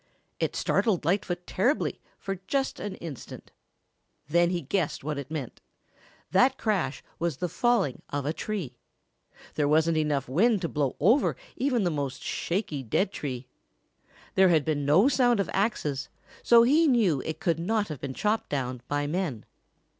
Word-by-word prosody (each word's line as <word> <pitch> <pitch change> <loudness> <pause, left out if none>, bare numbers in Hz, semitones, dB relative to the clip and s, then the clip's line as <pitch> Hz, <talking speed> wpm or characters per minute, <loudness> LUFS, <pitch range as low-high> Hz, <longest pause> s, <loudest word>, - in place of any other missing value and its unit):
It - - -1
startled 195 -9 +1
Lightfoot 175 0 0
terribly 250 +11 0 0.2
for 195 -2 -5
just 275 +2 -1
an 205 -2 -4
instant. 155 -7 -9 0.8
Then 170 +3 +3
he 175 -1 -1
guessed 180 -8 -1
what 150 0 -3
it 140 -1 -7
meant. 150 -6 -6 0.7
That 255 +8 +4
crash 190 - -1 0.2
was 165 -4 -1
the 180 - -1
falling 185 - +1
of 145 -1 -3
a 150 - 0
tree. 170 - -4 0.8
There 150 -2 +1
wasn't 160 +2 +3
enough 145 -3 0
wind 195 - +2
to - - +1
blow 145 -4 -1
over 225 - +3 0.2
even 250 -4 +1
the 175 - +1
most 140 -4 -3
shaky 170 -6 -2
dead 155 - 0
tree. 130 -8 -5 0.9
There 190 -1 +5
had 160 -4 +3
been 145 -3 -1
no 165 - +5
sound 245 -5 +3
of 200 - -1
axes, 150 - -1 0.3
so 235 -1 +6
he 305 +7 +4
knew 210 - +3
it 160 - -5
could 170 -7 0
not 210 +3 0
have 150 -5 -6
been 135 -2 -5
chopped 215 +1 0
down 130 -3 -2
by 145 0 -1
men. 150 - -2
170 Hz, 160 wpm, -27 LUFS, 145-210 Hz, 0.9 s, so